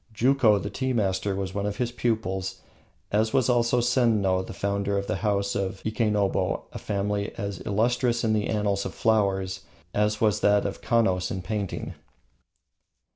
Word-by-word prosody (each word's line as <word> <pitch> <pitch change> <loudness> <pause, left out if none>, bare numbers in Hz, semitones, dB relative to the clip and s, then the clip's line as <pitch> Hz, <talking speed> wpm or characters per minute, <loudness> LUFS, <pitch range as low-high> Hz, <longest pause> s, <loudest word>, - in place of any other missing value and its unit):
Juko, 120 -2 +4
the 100 +1 -4
tea 130 -1 -1
master, 100 -3 0
was 95 -1 -3
one 100 +1 -1
of 105 0 -3
his 120 -1 -1
pupils, 95 -6 -2 0.5
as 110 +2 +1
was 130 -1 +3
also 120 0 +3
Senno, 110 -7 +2
the - - -8
founder 100 0 -1
of 100 - -1
the - - -2
house 100 -2 0
of 95 -1 -3
Ikenobo, 105 -4 0
a - - -6
family 100 0 -2
as 100 -2 -4
illustrious 120 +3 +1
in 110 -1 +2
the 105 -1 0
annals 100 -2 0
of - - -6
flowers 95 -4 +1 0.3
as 105 0 +1
was 105 -4 +2
that 105 0 +3
of 100 - -4
the - - -16
Kanos 95 -6 +2
in 95 -2 -4
painting. 105 -3 -3
105 Hz, 170 wpm, -26 LUFS, 100-115 Hz, 0.5 s, Juko